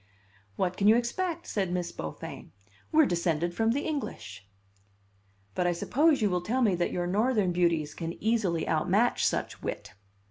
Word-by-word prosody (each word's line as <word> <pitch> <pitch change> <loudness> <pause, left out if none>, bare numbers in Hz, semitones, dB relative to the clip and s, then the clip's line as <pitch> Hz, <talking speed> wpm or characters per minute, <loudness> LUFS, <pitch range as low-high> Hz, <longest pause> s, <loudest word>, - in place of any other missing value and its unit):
"'What 180 - -1
can 200 - +2
you 220 - +7
expect?' 340 +9 -1
said 190 -4 -2
Miss 175 -1 -2
Beaufain; 80 -1 -7 0.4
'we're 315 -1 +6
descended 170 - 0
from 225 +5 +1
the 280 +4 0
English.'" 100 - -5 1.0
"But 175 - 0
I 175 - +2
suppose 285 - +2
you 205 - +3
will 180 -1 0
tell 245 +8 0
me 210 -5 +3
that 175 0 0
your 175 -1 -2
Northern 210 +1 +1
beauties 170 -4 +1
can 165 0 -5
easily 205 -8 0
outmatch 185 +9 +2
such - - -1
wit." - - -5
185 Hz, 165 wpm, -28 LUFS, 170-235 Hz, 1.0 s, you